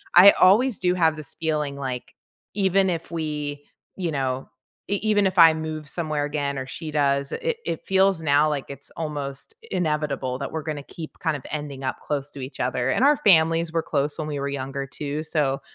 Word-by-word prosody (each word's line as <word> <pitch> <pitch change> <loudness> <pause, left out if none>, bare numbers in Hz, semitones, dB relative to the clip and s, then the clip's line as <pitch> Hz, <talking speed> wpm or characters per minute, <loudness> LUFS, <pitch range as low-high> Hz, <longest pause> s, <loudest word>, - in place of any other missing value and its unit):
I 185 +3 +11
always 220 +6 +5
do 180 0 +2
have 165 -3 +3
this 155 -4 -9
feeling, 150 -3 -1
like, 130 -3 -5 0.4
even 195 -1 +3
if 165 -2 -3
we 150 -3 -3 0.3
you 180 -3 -2
know, 135 -2 -2 0.4
e 200 - +2
even 205 -2 +3
if 185 0 -4
I 165 -1 +9
move 155 -1 -5
somewhere 155 -2 -2
again 145 -1 -2
or 130 - -4
she 155 +4 -6
does, 140 -2 +1
it 480 -1 -2
it 165 - -3
feels 190 -2 +3
now 145 0 +4
like 145 -3 -2
it's 140 0 -10
almost 145 - -5 0.2
inevitable 150 -6 -1
that 140 - -4
we're 160 -1 -4
gonna 150 -2 -4
keep, 160 +2 -9
kind 160 -4 0
of 130 - -13
ending 145 -3 -5
up 130 - -2
close 145 -1 -3
to 140 - -9
each 130 +2 -8
other, 125 0 0
and 180 - +2
our 290 +1 +5
families 165 - +4
were 165 0 +1
close 145 +1 -1
when 155 - -2
we 145 -2 -3
were 140 0 -2
younger, 135 0 -4
too, 145 +2 -4
so 150 -4 0
150 Hz, 200 wpm, -24 LUFS, 140-170 Hz, 0.4 s, I